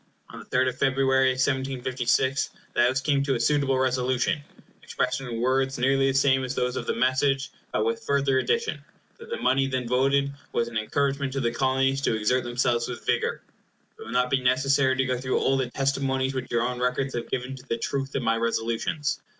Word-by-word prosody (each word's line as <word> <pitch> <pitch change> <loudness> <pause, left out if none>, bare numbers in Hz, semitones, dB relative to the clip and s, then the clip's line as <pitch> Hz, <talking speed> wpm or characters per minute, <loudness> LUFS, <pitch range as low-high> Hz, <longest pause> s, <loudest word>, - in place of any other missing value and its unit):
On - - -9
the - - -11
3d 130 0 +1
of 130 +1 -9
February, 135 0 +3
1756, 130 0 0 0.2
the - - +2
House 130 +2 +2
came 140 +1 +1
to 140 -1 0
a - - -2
suitable 135 +1 +2
Resolution, 130 +4 0 0.4
expressed 125 +1 -2
in 120 -3 -5
words 130 +2 +1
nearly 135 +2 +2
the 135 - 0
same 135 -1 +3
as 130 0 -3
those 125 0 -1
of - - -4
the - - 0
message, 135 +2 +1 0.2
but 105 - 0
with 115 0 0
the - - -18
further 140 -1 +2
addition, 460 - -1 0.4
that 465 0 -12
the 475 - -3
money 135 +1 +2
then 130 -2 -2
voted 140 +3 +2 0.2
was 115 - +1
as - - -8
an 115 - -3
encouragement 140 +4 -1
to 135 - -1
the 120 -3 0
Colonies 135 +2 +1
to 115 - +1
exert 115 +4 +1
themselves 120 -1 0
with 125 - -7
vigor. - - 0 0.6
It - - -8
will - - -10
not 125 0 +1
be 135 - +2
necessary 130 +1 +2
to 130 0 +1
go 130 -2 -1
through 130 0 -1
all 135 - +2
the 130 -2 -1
testimonies 135 0 0
which 130 -1 -4
your 120 -1 +1
own 125 -1 -2
records 125 +2 -1
have 120 -1 -4
given 125 +1 -3
to 130 - -12
the 115 - 0
truth 135 +3 -3
of 130 - -1
my 115 0 +2
Resolutions. 115 +5 -1
130 Hz, 215 wpm, -26 LUFS, 125-135 Hz, 0.6 s, February